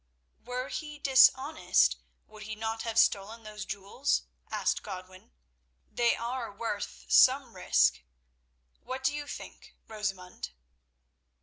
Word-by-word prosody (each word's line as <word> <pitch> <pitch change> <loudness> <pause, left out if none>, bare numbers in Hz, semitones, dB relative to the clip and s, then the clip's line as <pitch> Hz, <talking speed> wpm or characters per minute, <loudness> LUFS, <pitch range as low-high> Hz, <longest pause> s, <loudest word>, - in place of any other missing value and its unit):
"Were 250 +2 -4
he 300 -1 -5
dishonest 280 - +4 0.3
would 215 0 -14
he 215 +1 -6
not 225 +1 -3
have 225 -1 -4
stolen 220 +1 +2
those 210 -2 -7
jewels?" 200 +8 -1 0.3
asked - - 0
Godwin. 185 0 -9 0.6
"They 240 -1 +2
are 235 -1 -4
worth 200 - -5
some 60 0 +5
risk. - - +3 0.8
What 260 +1 -6
do 265 - +2
you 295 0 -5
think, - - -10
Rosamund?" 195 - -5
225 Hz, 115 wpm, -30 LUFS, 200-260 Hz, 0.8 s, some